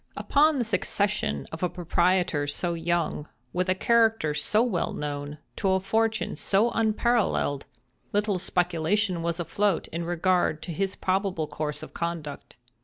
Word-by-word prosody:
Upon 300 +1 +3
the 245 - 0
succession 200 - 0
of 160 - -7
a 180 - +1
proprietor 175 -3 +1
so 170 +4 -1
young, 165 -2 -1 0.2
with 180 +1 0
a 185 - +3
character 225 -7 +3
so 210 +9 +2
well 205 -9 -1
known, 145 0 -4 0.2
to 190 -1 +2
a 190 - +3
fortune 220 +3 0
so 210 +4 +2
unparalleled, 220 - +1 0.4
little 205 -2 +1
speculation 180 +1 0
was 170 +1 -2
afloat 200 +2 0
in 170 +1 -4
regard 175 -2 +1
to 170 - -5
his 195 +3 -1
probable 190 -3 0
course 150 0 -4
of - - -10
conduct. 165 -7 -5
180 Hz, 145 wpm, -27 LUFS, 160-205 Hz, 0.4 s, Upon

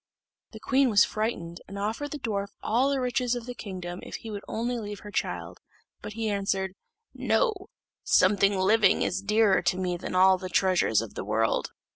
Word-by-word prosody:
The - - -9
queen 270 -1 +2
was 205 -3 +5
frightened, 175 -6 -3
and 200 - -8
offered 220 +8 -3
the 295 - -5
dwarf 205 -7 -2 0.2
all 245 +5 +2
the 280 -1 0
riches 250 -1 0
of 240 -2 -5
the 245 - -6
kingdom 180 -6 -7
if - - -8
he 225 - -7
would 205 -1 -5
only 240 +2 -2
leave 205 -2 -7
her 210 - -9
her - - -11
child; - - -3 0.4
but 210 - -7
he 225 0 -3
answered, 195 -2 -1 0.4
"No; 475 -3 +1 0.5
something 195 +1 +4
living 200 +1 +4
is 190 +2 -1
dearer 210 -1 +3
to 175 +1 0
me 180 -1 -1
than 180 - -6
all 185 0 +5
the 185 - -6
treasures 180 - +2
of 115 - -9
the - - -5
world." 110 +2 0
200 Hz, 195 wpm, -27 LUFS, 185-230 Hz, 0.5 s, was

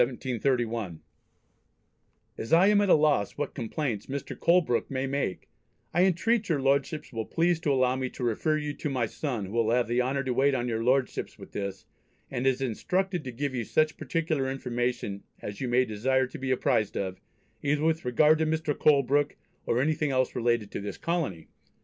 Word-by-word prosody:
As 115 - -5
I 170 +3 +6
am 205 -1 +5
at 200 - +1
a - - +8
loss 150 -9 +2
what 145 0 -3
complaints 120 -3 -3
Mr. 140 +1 -5
Colebrooke 170 -9 +2
may 130 0 -2
make, 135 -8 -2 0.5
I 175 +3 +4
entreat 210 +5 +1
your 155 -4 +2
Lordships 140 +2 0
will 110 -1 -3
please 170 0 +1
to 150 - 0
allow 130 -1 +3
me 130 -1 -2
to 125 - -7
refer 125 +7 +1
you 150 -1 -3
to 150 - -4
my 130 -4 0
son 120 -3 -3
who 95 - -9
will 115 0 +1
have 120 0 +2
the 120 +2 +1
honour 135 +2 -1
to 130 -1 -1
wait 135 +2 +3
on 120 -1 -1
your 115 -1 -1
Lordships 130 +2 0
with - - -12
this, 100 -1 -5 0.5
and 125 +2 -1
is 130 0 +2
instructed 180 - -1
to 130 - -4
give 135 +3 -3
you 125 -2 -2
such 155 +7 +1
particular 155 -5 -1
information, 120 -5 -2 0.2
as 105 +3 -7
you 130 - -1
may 125 +1 +3
desire 130 +4 +1
to 125 - -9
be 135 0 -3
apprised 110 -5 +1
of, 95 -1 -3 0.4
either 150 +1 0
with 160 0 +1
regard 150 +6 +4
to 160 - +1
Mr. 155 -1 0
Colebrooke, 145 0 +3 0.3
or 115 - +2
anything 150 +2 +1
else 130 -1 +1
relating 120 -3 +1
to - - -5
this 100 - -5
colony. 160 - -2
135 Hz, 190 wpm, -28 LUFS, 120-155 Hz, 0.5 s, a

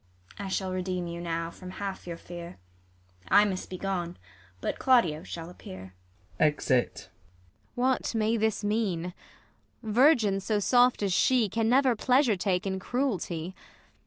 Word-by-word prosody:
ISAB. - - -4
I - - -4
shall 190 0 -2
redeem 185 -1 -2
you 170 0 -6
now 165 -1 -3
from 185 +1 -10
half 195 0 -6
your 170 -1 -5
fear; 175 0 -9 0.7
I 205 - +6
must 190 -2 -3
be 185 - -5
gone, 180 -3 -3 0.4
but - - -3
Claudio 205 -13 +3
shall 165 -1 -7
appear. 95 - -10 0.5
[Exit. 145 -4 +1 0.7
Ang. 245 - 0
Whatmay 230 -3 +1
this 220 -1 0
mean'? 195 -5 -1 0.7
Virgins 220 -4 +3
so 215 +1 0
soft 245 +2 +4
as 195 -2 +1
she 245 +2 +3
Can 225 +2 0
never 260 0 +4
pleasure 250 0 +3
take 185 0 -1
in 190 -1 -2
cruelty. 190 - -2
195 Hz, 145 wpm, -28 LUFS, 175-225 Hz, 0.7 s, I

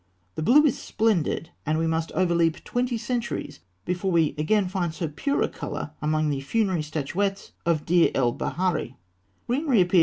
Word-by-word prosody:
The - - -4
blue 285 - +6
is 280 - +2
splendid, 195 -7 0
and 155 +1 0
we 165 - +1
must 160 0 -1
overleap 170 -3 +1
twenty 245 -1 -1
centuries 240 +1 -3 0.3
before 180 +1 -1
we 165 -3 +3
again 190 +6 +2
find 180 -3 -1
so 165 +1 -3
pure 280 - 0
a - - +2
colour - - -5
among 155 0 +1
the 135 -1 -2
funerary 190 +2 0
statuettes 165 +7 -2 0.2
of 160 -3 +1
Deir 170 0 +4
el 120 -3 +2
Baharî. 170 -8 -1
170 Hz, 155 wpm, -25 LUFS, 155-200 Hz, 0.3 s, blue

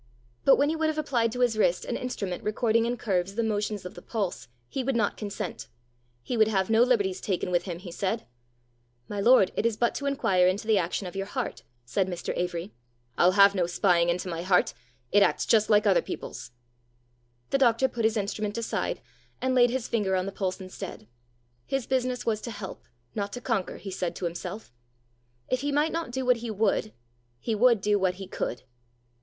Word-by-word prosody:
But 275 - +8
when 285 +1 +2
he 320 - 0
would 320 0 +1
have 310 - -3
applied 245 -7 +1
to 245 - -3
his 240 -3 +3
wrist 180 -5 +2
an - - -2
instrument 200 -8 -4
recording 225 +2 +2
in 245 +1 -1
curves 195 -3 -1
the 230 - +1
motions 210 -2 -2
of 180 - -6
the 175 - -11
pulse, 200 - -3 0.2
he 260 - -3
would 270 0 0
not 215 -3 +1
consent. 195 - -5 0.6
He 245 - -3
would 220 -2 +5
have 195 -1 0
no 225 +1 +5
liberties 210 -7 +2
taken 185 -2 -1
with 175 0 +1
him, 175 -3 -4
he 175 0 -9
said. 200 +5 -2 0.8
"My 205 - -4
lord, 230 -3 +6
it - - 0
is 230 -2 +1
but 235 - +2
to 280 - -3
inquire 190 -10 +3
into 195 +4 0
the 215 -2 +4
action 180 +3 -2
of 180 - -7
your 195 0 -3
heart," - - -4 0.2
said 185 +11 0
Mr. 175 -2 -4
Avory. 175 +1 -3 0.4
"I'll 180 +1 +4
have 200 0 +7
no 180 -3 +1
spying 175 -1 +3
into 175 +2 -1
my 170 -2 -3
heart! 180 0 +2 0.4
It 205 - +5
acts - - +3
just 215 -2 +3
like 210 -1 +5
other 195 -3 +4
people's!" - - -7 1.0
The 275 - +2
doctor 245 0 +4
put 235 -2 -4
his 220 0 +2
instrument 210 +1 -2
aside, 230 - -2 0.4
and 260 0 0
laid 245 -1 +5
his 250 -1 -2
finger 205 -5 0
on 185 0 0
the 195 - -4
pulse 190 -1 -2
instead: 185 - -8 0.6
his 270 -3 -1
business 255 -1 -1
was 220 -2 0
to - - -5
help, 205 -4 -8 0.3
not 200 -1 -3
to 245 - -4
conquer, 230 -6 -2
he 195 - -7
said 180 -1 -3
to 185 - -4
himself: 175 - -5 0.7
if 255 0 0
he 285 +1 -1
might 295 +3 +2
not 330 -3 -3
do 260 +1 -3
what 250 -1 +4
he 235 0 -6
would, 215 0 0 0.5
he 225 - -2
would 230 0 +4
do 205 0 +2
what 185 -1 +1
he 195 +1 -7
could. 125 - -4
210 Hz, 210 wpm, -27 LUFS, 185-235 Hz, 1.0 s, But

